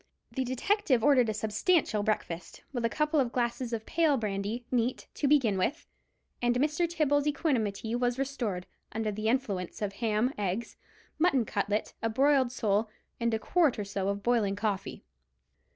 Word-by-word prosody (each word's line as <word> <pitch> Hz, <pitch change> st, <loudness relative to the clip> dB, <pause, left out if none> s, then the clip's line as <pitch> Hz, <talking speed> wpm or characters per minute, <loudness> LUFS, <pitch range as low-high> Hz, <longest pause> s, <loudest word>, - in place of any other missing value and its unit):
The 265 Hz, -, -1 dB
detective 260 Hz, -, +1 dB
ordered 255 Hz, -5 st, +5 dB
a -, -, 0 dB
substantial 215 Hz, -, +1 dB
breakfast, 180 Hz, -5 st, -3 dB
with 240 Hz, -3 st, -2 dB
a 230 Hz, -, +2 dB
couple 300 Hz, +3 st, +1 dB
of 250 Hz, -3 st, +1 dB
glasses 240 Hz, 0 st, -1 dB
of 225 Hz, -1 st, -3 dB
pale 315 Hz, -4 st, +2 dB
brandy, 210 Hz, +2 st, -3 dB
neat, 245 Hz, 0 st, 0 dB
to 290 Hz, -, 0 dB
begin 250 Hz, -9 st, +3 dB
with; 290 Hz, -, -1 dB, 0.6 s
and 240 Hz, 0 st, +2 dB
Mr. 300 Hz, +6 st, +1 dB
Tibbles' 295 Hz, -3 st, +1 dB
equanimity 230 Hz, -, 0 dB
was 245 Hz, 0 st, 0 dB
restored, 245 Hz, -10 st, -2 dB, 0.3 s
under 220 Hz, -1 st, -1 dB
the 215 Hz, +1 st, -3 dB
influence 215 Hz, -8 st, -1 dB
of 205 Hz, -2 st, -2 dB
ham, 225 Hz, +4 st, 0 dB
eggs, 205 Hz, +3 st, -2 dB, 0.4 s
mutton 280 Hz, -8 st, +3 dB
cutlet, 205 Hz, +1 st, -1 dB
a 225 Hz, -, 0 dB
broiled 265 Hz, +1 st, +3 dB
sole, 215 Hz, -3 st, 0 dB, 0.3 s
and 235 Hz, -1 st, +1 dB
a 220 Hz, -, +1 dB
quart 315 Hz, +4 st, +2 dB
or 210 Hz, -, -3 dB
so 195 Hz, -1 st, -2 dB
of 200 Hz, 0 st, -2 dB
boiling 225 Hz, -5 st, +2 dB
coffee. 205 Hz, -2 st, -3 dB
235 Hz, 165 wpm, -30 LUFS, 210-275 Hz, 0.6 s, ordered